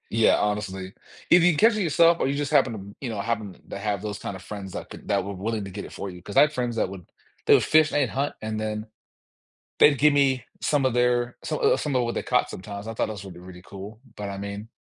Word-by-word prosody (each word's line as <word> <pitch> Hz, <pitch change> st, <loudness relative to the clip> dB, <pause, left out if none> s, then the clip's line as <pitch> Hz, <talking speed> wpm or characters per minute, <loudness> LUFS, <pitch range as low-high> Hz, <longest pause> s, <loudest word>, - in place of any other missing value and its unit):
Yeah, 115 Hz, 0 st, +4 dB
honestly. 100 Hz, -2 st, -2 dB, 0.4 s
If 175 Hz, -1 st, +7 dB
you 175 Hz, -2 st, +5 dB
catch 225 Hz, +7 st, +5 dB
it 210 Hz, -, 0 dB
yourself 165 Hz, +1 st, +4 dB
or -, -, +1 dB
you 140 Hz, -, 0 dB
just 145 Hz, 0 st, -2 dB
happen 135 Hz, -5 st, +4 dB
to 110 Hz, -, -6 dB
m 100 Hz, +1 st, -11 dB
you 130 Hz, -, -3 dB
know, 110 Hz, -3 st, -4 dB
happen 105 Hz, -4 st, -3 dB
to -, -, -5 dB
have 100 Hz, -1 st, -2 dB
those 105 Hz, -1 st, -5 dB
kind 100 Hz, -, -5 dB
of 95 Hz, -, -9 dB
friends 100 Hz, -3 st, -8 dB
that -, -, -6 dB
could -, -, -11 dB
that 100 Hz, -1 st, +1 dB
were 100 Hz, +1 st, -5 dB
willing 105 Hz, +2 st, -3 dB
to 95 Hz, -, -8 dB
get -, -, -6 dB
it -, -, -11 dB
for 100 Hz, -, -5 dB
you, 90 Hz, -1 st, -10 dB
'cause 105 Hz, -, -6 dB
I -, -, +9 dB
had 150 Hz, +1 st, +4 dB
friends 125 Hz, -3 st, -2 dB
that 100 Hz, -, +1 dB
would 95 Hz, -3 st, -9 dB, 0.4 s
they -, -, +6 dB
would -, -, +5 dB
fish 155 Hz, -1 st, +4 dB
and 140 Hz, -4 st, +1 dB
hunt 140 Hz, +2 st, -2 dB
and 110 Hz, 0 st, -3 dB
then 110 Hz, 0 st, -3 dB, 0.9 s
they'd 145 Hz, -2 st, +6 dB
gimme 140 Hz, -3 st, +3 dB, 0.2 s
some 145 Hz, -3 st, +1 dB
of 130 Hz, -2 st, +2 dB
their 120 Hz, 0 st, +1 dB
some 155 Hz, -1 st, -2 dB
o -, -, +4 dB
some 150 Hz, -3 st, -2 dB
of 125 Hz, -, +3 dB
what 120 Hz, -, -2 dB
they -, -, -2 dB
caught -, -, +1 dB
sometimes. 100 Hz, +2 st, -7 dB
I 115 Hz, -, -5 dB
thought -, -, 0 dB
that 110 Hz, -, -5 dB
was 100 Hz, -2 st, -8 dB
really, 90 Hz, -3 st, -10 dB
really 90 Hz, 0 st, -12 dB
cool, 100 Hz, +4 st, -10 dB, 0.2 s
but 105 Hz, -1 st, -5 dB
I 100 Hz, 0 st, -5 dB
mean, 100 Hz, +2 st, -6 dB
110 Hz, 275 wpm, -25 LUFS, 100-135 Hz, 0.9 s, I